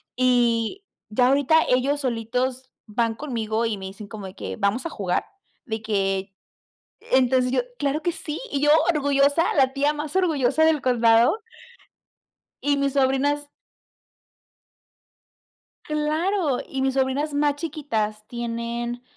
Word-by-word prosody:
y, 245 - +1 0.3
ya 245 +3 +4
ahorita 280 +4 +4
ellos 270 +3 +2
solitos 250 +1 -2
van 225 +1 -1
conmigo 230 -4 -2
y 225 -2 -1
me 190 - -8
dicen 200 +2 -9
como 210 -2 -8
de 185 - -10
que: - - -6
"Vamos 215 +7 0
a - - -2
jugar". 190 - -2 0.4
De 220 -4 -4
que 195 -2 -1 0.8
entonces 255 -1 +3
yo: - - +3 0.2
"Claro 285 +2 -1
que 345 - +1
sí". 310 -2 -5
Y 280 - -1
yo 295 - +3 0.2
orgullosa, 285 +2 +2
la 265 -3 +3
tía 285 +2 +1
más 300 +2 -5
orgullosa 315 -5 +2
del 320 -2 +3
condado. 235 - +4 1.3
Y 285 0 +2
mis 280 -1 0
sobrinas. 285 +2 +1 2.3
Claro, 305 +1 0
y 270 - -4
mis 265 0 0
sobrinas 270 +3 0
más 290 0 +2
chiquitas 230 -9 -3
tienen 235 0 -4
260 Hz, 130 wpm, -24 LUFS, 230-290 Hz, 2.3 s, ya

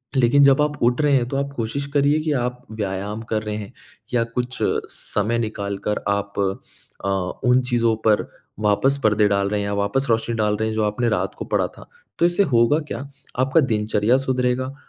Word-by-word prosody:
लेकिन 135 +2 +5
जब 140 +1 +5
आप 150 -1 0
उठ 120 +4 +3
रहे 145 -1 +3
हैं, 125 -3 +2
तो 135 - -2
आप 140 0 -2
कोशिश 120 +5 -3
करिए 145 +2 +3
कि 155 0 -1
आप 125 -1 -2
व्यायाम 105 0 -4
कर 110 - +1
रहे 105 -1 -3
हैं 105 -2 -8 0.4
या 115 -1 +3
कुछ 125 +1 -2 0.3
समय 110 +3 -2
निकाल 100 -3 -3
कर 105 - 0
आप 100 0 -2 0.7
अ, - - +1 0.3
उन 125 +1 +4
चीज़ों 115 -2 +2
पर 105 -1 +3 0.3
वापस 120 +7 +2
पर्दे 105 -1 +4
डाल 100 0 +1
रहे 105 0 0
हैं 100 - -2
या 100 - -2
वापस 100 +7 0
रोशनी 115 +1 +1
डाल 105 -1 +1
रहे 110 0 -1
हैं, - - -3
जो 110 - +1
आपने 110 +3 0
रात 105 - -1
को - - -6
पढ़ा - - +1
था। - - -12 0.3
तो 170 - +4
इससे 175 +3 +3
होगा 120 0 +3
क्या, 115 - -4 0.4
आपका 135 +5 +3
दिनचर्या 110 -1 +2
सुधरेगा, 130 0 -1
115 Hz, 200 wpm, -22 LUFS, 105-135 Hz, 0.7 s, लेकिन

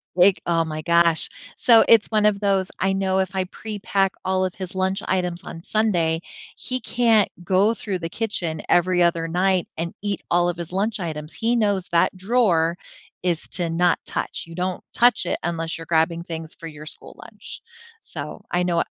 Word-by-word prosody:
like, 185 +1 +5
oh 165 -1 +2
my 155 0 -5
gosh, 170 0 +3 0.3
so 230 -2 +6
it's 225 -2 +6
one 215 -1 +2
of 210 -1 +3
those, 195 -2 +1
I 195 0 +1
know 190 -1 +1
if 190 0 -1
I 190 - +1
prepack 195 -1 -2
all 185 0 +1
of 185 - -4
his 185 -1 -6
lunch 190 +1 0
items 180 -2 -1
on 165 - -8
Sunday, 175 -7 +1 0.3
he 255 0 -3
can't 230 -5 +2
go 195 +5 +3
through 195 -5 -4
the 165 -1 -4
kitchen 175 -8 -3
every 175 0 +3
other 170 -1 +1
night 180 +1 +1
and 170 +1 -3
eat 205 -1 -2
all 175 0 +3
of 175 - -4
his 170 0 -6
lunch 205 +2 -1
items, 155 -2 -5
he 235 +1 0
knows 205 -5 +1
that 170 +2 +2
drawer 185 -5 +2 0.5
is 175 -3 -1
to 175 -2 0
not 175 +2 +2
touch, - - -4
you 165 - -10
don't 180 0 -3
touch 245 +1 +3
it - - -1
unless 165 -1 -2
you're 165 - -9
grabbing 165 +1 +1
things 165 -2 -5
for 165 - -9
your 155 -1 -10
school - - -11
lunch, - - -10 0.4
so - - -8
I 175 0 +1
know 170 -2 +1
180 Hz, 190 wpm, -23 LUFS, 170-200 Hz, 0.5 s, so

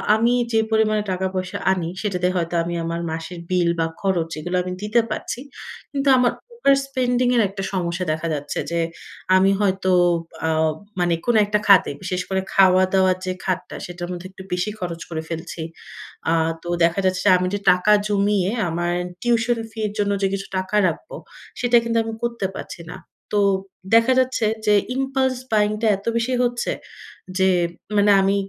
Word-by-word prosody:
আমি 230 +2 +2 0.2
যে, 225 - +4
পরিমাণে 215 -1 +2
টাকা-পয়সা 185 +1 -2
আনি, 175 -3 -1
সেটাতে 180 -4 0
হয়তো 170 -1 -1
আমি 175 +1 -4
আমার 165 +1 -3
মাসের 165 +2 -6
বিল 180 -2 +2
বা 165 - +2
খরচ, 180 -4 0
এগুলো 175 +3 -3
আমি 180 0 -4
দিতে 210 +3 +3
পারছি। 215 - -4 0.5
কিন্তু 275 0 +1
আমার 245 - +3 0.3
ওভার 275 - +6
স্পেন্ডিং 250 -2 +1
এর 235 - +4
একটা 195 0 -6
সমস্যা; 180 -1 -1
দেখা 160 +1 -3
যাচ্ছে 145 -1 -3
যে, 170 - 0 0.6
আমি 190 +1 +5
হয়তো 190 -1 +1 0.6
আ - - +1 0.5
মানে 175 -1 +2
কোন 240 - +2
একটা 210 +1 +1
খাতে, 200 -2 +6
বিশেষ 180 0 -2
করে 190 0 0
খাওয়া-দাওয়া 185 0 +4
যে, 185 - -1
খাতটা, 185 -1 -2
সেটার 175 0 -6
মধ্যে 180 +1 -6
একটু 190 - -11
বেশি 180 +4 -1
খরচ 170 -2 -5
করে 160 -2 -3
ফেলছি। 165 0 -5 0.7
আ - - +3 0.3
তো - - -9 0.2
দেখা 170 +3 +2
যাচ্ছে 185 -1 +1
যে, - - +7
আমি 180 0 -1
যে, 205 - 0
টাকা 180 +3 +2 0.2
জমিয়ে 200 -2 +1 0.2
আমার 175 +1 -1 0.3
টিউশন 240 0 +1
ফি 220 - -10
এর 205 - -7
জন্য 205 0 +1
যে, 195 - +3
কিছু 195 0 -4
টাকা 185 +2 -2
রাখবো, 170 - -5 0.4
সেটা 245 -1 +4
কিন্তু 230 0 -1
আমি 225 0 -5
করতে 235 -4 -2
পারছি - - -8
না। - - -7 0.4
তো - - +4 0.6
দেখা 230 +3 +5
যাচ্ছে 255 -3 +1 0.2
যে, 210 - +4 0.2
ইমপালস 265 -1 0
বায়িং 210 -1 +3
টা 225 - +2
এত 200 - -16
বেশি 235 +2 0
হচ্ছে 240 0 -1 0.7
যে, 190 0 +4 0.5
মানে 205 0 +5
আমি 195 +1 +2
190 Hz, 175 wpm, -22 LUFS, 180-225 Hz, 0.7 s, যে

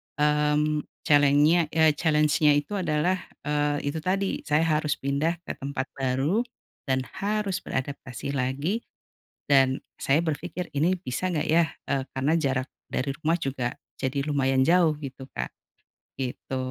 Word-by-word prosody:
mmm, 150 0 +2 0.2
challenge-nya, 145 +3 +5
eee, 160 -1 +6
challenge-nya 150 -2 +4
itu 190 +8 -1
adalah, 175 +2 +1 0.2
eee, 145 -1 0
itu 160 - -4
tadi 190 +4 0
saya 150 +1 +3 0.2
harus 150 -2 0
pindah 140 +5 0
ke - - -5
tempat 135 -1 -3
baru, 135 - +1 0.5
dan 130 -1 +1 0.2
harus 205 -2 0
beradaptasi 130 0 -4
lagi, 140 - -1 0.7
dan 135 -2 +4 0.2
saya 145 +4 +3
berpikir 160 +3 -3
ini 170 +6 +2
bisa 185 +2 -3
nggak 155 -4 -1
ya, 165 +2 +4 0.2
eee, 135 -1 0
karena 135 +4 +1
jarak 135 -3 0 0.2
dari 135 +2 -1
rumah 165 +2 +2
juga 130 -5 -2 0.3
jadi 140 +1 -1
lumayan 135 -3 +2
jauh 165 -1 +4
gitu 135 -2 -8
Kak. 60 - -4 0.7
Gitu. 130 0 -4
150 Hz, 135 wpm, -26 LUFS, 135-160 Hz, 0.7 s, eee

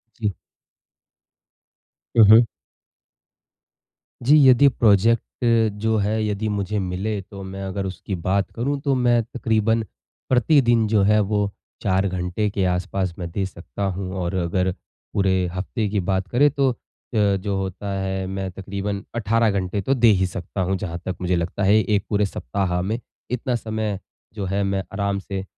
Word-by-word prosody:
जी। 105 -3 -1 1.8
हुँ, 115 - +9
हुँ। 115 +2 +8 1.8
जी, 145 +5 +6
यदि 130 +3 +7
प्रोजेक्ट 115 -2 +3 0.6
जो 110 0 +2
है, 110 +1 0
यदि 105 +1 -2
मुझे 105 0 -1
मिले, 100 +3 -2
तो 100 +1 -10
मैं 95 0 -6
अगर 95 0 -3
उसकी 95 +1 -5
बात 100 +1 +1
करूँ, 140 +4 -2
तो 140 0 +1
मैं 120 -2 +3
तकरीबन 110 -1 0 0.5
प्रतिदिन 120 -3 +4
जो 105 -2 +3
है, 105 - +5
वो 105 0 0 0.3
4 95 0 +2
घंटे 90 +3 -1
के 100 -1 -1
आसपास 90 0 -1
मैं 85 -2 -5
दे 95 +3 -2
सकता 95 +2 -8
हूँ 95 -1 -4
और 85 +1 -2
अगर 90 +1 0 0.4
पूरे 95 -2 +2
हफ़्ते 100 +4 -2
की 100 0 0
बात 95 0 0
करें, 145 +8 +4
तो 140 -1 +2 0.4
अ, - - 0
जो 100 -1 +1
होता 95 +1 -4
है, 95 0 -2
मैं 95 0 -4
तकरीबन 100 +1 -4
18 115 0 +2
घंटे 100 0 -1
तो 130 - 0
दे 120 -3 +4
ही 95 0 +2
सकता 90 +2 -5
हूँ। 95 +2 0
जहाँ 85 -4 -4
तक 95 - -2
मुझे 90 0 +1
लगता 85 +4 -2
है, 100 +2 +5
एक 105 -2 0
पूरे 105 0 +2
सप्ताह 90 +1 -2
में 105 +5 -2 0.3
इतना 125 +1 -1
समय 110 -3 -3 0.4
जो 105 -3 -4
है, 100 +2 0
मैं 95 0 0
आराम 100 0 -1
से 95 -1 -5
100 Hz, 160 wpm, -22 LUFS, 95-110 Hz, 1.8 s, हुँ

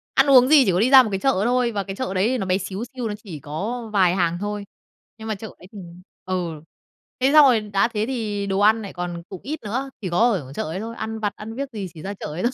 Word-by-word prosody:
Ăn 270 - +4
uống 255 -2 +7
gì 285 -3 +6
chỉ 190 - +3
có 180 - +1
đi 240 +4 +3
ra 265 -2 +9
một 220 - -3
cái 195 - -1
chợ 265 -4 +1
thôi, 245 -1 +2
và 205 -3 -2
cái 195 0 -7
chợ 255 -5 -3
đấy 220 +7 +1
nó 195 - -3
bé 185 0 +1
xíu 195 +2 -5
xiu, 250 -3 -3
nó 210 - -3
chỉ 165 -8 -8
có 215 - -5
vài 185 -2 +3
hàng 175 -2 +1
thôi. 205 0 -3 0.5
Nhưng 220 - -9
mà 215 - -1
chợ 220 +3 -8
ấy 180 - -15
thì 210 - -10 0.5
ừ, 175 -4 -3 0.6
thế 260 +2 +3
xong 305 -2 +9
rồi 245 -4 +5
đã 205 0 +1
thế 215 -2 -2
thì 210 -6 -3
đồ 195 0 0
ăn 220 +2 +4
nại 200 - -8
còn 175 -1 -5
cũng 190 - -8
ít 300 +3 -5
nữa, 255 +6 -3
chỉ 185 - -3
có 170 - 0
ở 140 -9 -4
chợ - - -3
ấy 160 +5 -4
thôi, 230 +2 -6
ăn 220 0 -5
vặt, 205 -2 -2
ăn 220 +1 -8
viếc 275 +2 -4
gì 200 -3 -4
chỉ 155 - -11
ra 200 - -5
chợ 195 - -9
ấy 155 +4 -5
thôi. 240 - +2
210 Hz, 285 wpm, -22 LUFS, 185-240 Hz, 0.6 s, ra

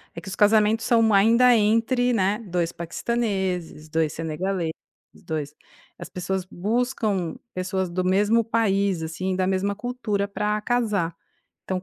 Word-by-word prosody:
é - - -6
que - - -14
os 195 - -4
casamentos 215 +1 +3
são 230 -3 +4
ainda 235 +5 +6
entre, 230 +3 +2
né, 200 -1 +1
2 170 -1 -1
paquistaneses, 185 -4 -3
2 160 -1 0
senegaleses, 165 +2 -2 0.4
dois 150 -2 -5 0.4
as - - -8
pessoas 185 +1 -3
buscam 210 -3 -1 0.2
pessoas 185 0 -2
do 180 +2 -2
mesmo 205 +5 +3
país, 200 -5 +1
assim, 185 +4 -3
da 185 0 0
mesma 195 +1 0
cultura 215 -3 -2
pra 210 +1 -1
casar. 210 -9 0 0.5
Então, 185 -1 -3
195 Hz, 135 wpm, -24 LUFS, 180-225 Hz, 0.5 s, ainda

